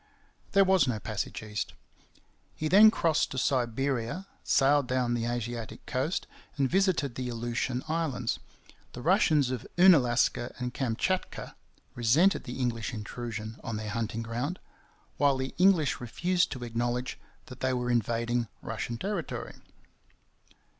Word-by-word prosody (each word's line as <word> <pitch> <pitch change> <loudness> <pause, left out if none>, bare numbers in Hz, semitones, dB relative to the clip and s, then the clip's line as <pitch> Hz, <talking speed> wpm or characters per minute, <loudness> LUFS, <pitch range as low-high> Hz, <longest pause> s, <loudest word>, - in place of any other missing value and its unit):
There 195 - +7
was 190 -5 +4
no 120 -3 0
passage 105 0 -4
east. 105 -1 -4 0.8
He 155 - -2
then 205 +6 +8
crossed 165 -7 +1
to 130 - -6
Siberia, 130 +4 0 0.2
sailed 140 0 +3
down 125 -1 +1
the 115 -1 -1
Asiatic 120 -1 -4
coast, 135 +8 -1 0.3
and 135 -2 +2
visited 180 -6 +1
the 125 0 -4
Aleutian 120 +2 -2
Islands. 155 -7 -1 0.5
The 125 - -8
Russians 155 -7 +3
of 125 -3 -4
Oonalaska 125 -9 +4
and 125 -1 -4
Kamchatka 135 +10 -2 0.4
resented 140 - +3
the 125 - -6
English 120 -2 -2
intrusion 110 0 -6
on 115 -2 -3
their 105 0 -4
hunting 115 +1 -2
ground, 120 +10 -3 0.6
while 140 -1 +3
the 130 0 -3
English 180 -7 +4
refused 175 +9 0
to 130 -3 -7
acknowledge 120 +2 -2 0.3
that 125 0 -11
they 130 0 +1
were 125 -1 -1
invading 120 +1 0 0.2
Russian 120 - -4
territory. 195 - -4
125 Hz, 135 wpm, -29 LUFS, 120-155 Hz, 0.8 s, then